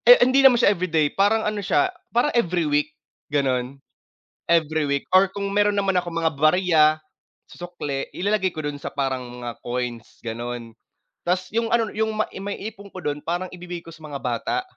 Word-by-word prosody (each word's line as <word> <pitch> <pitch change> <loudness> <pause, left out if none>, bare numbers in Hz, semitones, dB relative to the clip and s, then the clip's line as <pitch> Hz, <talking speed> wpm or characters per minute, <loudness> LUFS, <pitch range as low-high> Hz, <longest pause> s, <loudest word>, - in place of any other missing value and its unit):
Eh, - - +11
hindi 260 +2 +4
naman 265 -3 +7
siya 210 -3 +5
everyday 160 -5 0
parang 210 +3 +2
ano 210 -1 -1
siya, 200 - +1 0.2
parang 245 +5 +1
every 180 -8 +1
week 150 +1 +1 0.4
ganon, 135 -2 0 0.7
every 160 -2 +2
week. 140 0 0
Or 190 +1 +6
kung 200 +1 -4
meron 205 0 +2
naman 195 -1 +2
akong 175 -1 -6
mga 165 -1 +1
barya 160 +1 +4 0.7
sukli 175 -6 -5
ilalagay 190 -1 0
ko 155 - -4
dun 145 -1 -4
sa - - -6
parang 130 -2 -1
mga 120 -1 -7
coins 120 -2 -5
ganon. 120 0 -5 0.6
Tas 185 +1 0
yung 230 +1 0
ano, 230 -2 +2
yung 220 0 -1
ma 215 - 0
maiipon 200 +1 -6
ko - - -5
dun 145 0 -2
parang 175 +2 -3
ibibigay 175 -1 -7
ko 165 - -11
sa 160 -1 -15
mga 140 -2 -6
bata. 125 - -1
175 Hz, 180 wpm, -23 LUFS, 145-200 Hz, 0.7 s, Eh